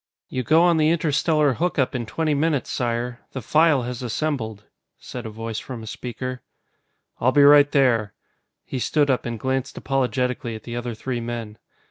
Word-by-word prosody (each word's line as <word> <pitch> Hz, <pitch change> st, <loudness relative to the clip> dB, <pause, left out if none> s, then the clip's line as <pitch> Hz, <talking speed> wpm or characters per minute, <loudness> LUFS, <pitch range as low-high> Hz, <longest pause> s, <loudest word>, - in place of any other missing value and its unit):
"You 130 Hz, -, -2 dB
go 160 Hz, +6 st, +4 dB
on 175 Hz, -2 st, +4 dB
the 155 Hz, 0 st, +3 dB
interstellar 155 Hz, -2 st, +2 dB
hookup 155 Hz, -2 st, 0 dB
in 120 Hz, -3 st, -3 dB
twenty 155 Hz, +5 st, 0 dB
minutes, 145 Hz, -1 st, 0 dB
Sire. 120 Hz, 0 st, -2 dB
The 130 Hz, -, -4 dB
File 155 Hz, -2 st, +3 dB
has 125 Hz, 0 st, -5 dB
assembled," 120 Hz, -4 st, -3 dB, 0.3 s
said 125 Hz, -2 st, -7 dB
a -, -, -5 dB
voice 115 Hz, 0 st, -5 dB
from 125 Hz, -4 st, -8 dB
a -, -, -8 dB
speaker. 125 Hz, +3 st, -6 dB, 0.8 s
"I'll 130 Hz, -, +3 dB
be 145 Hz, +1 st, +5 dB
right 145 Hz, 0 st, +7 dB
there." 115 Hz, -7 st, +2 dB, 0.5 s
He 130 Hz, -, -4 dB
stood 145 Hz, +2 st, +2 dB
up 125 Hz, -, -1 dB
and 115 Hz, -2 st, -4 dB
glanced 130 Hz, +1 st, -2 dB
apologetically 125 Hz, -3 st, -1 dB
at 110 Hz, -, -9 dB
the 120 Hz, -, -6 dB
other 120 Hz, -1 st, -4 dB
three 125 Hz, +2 st, -3 dB
men. 115 Hz, -2 st, -6 dB
130 Hz, 175 wpm, -23 LUFS, 120-145 Hz, 0.8 s, right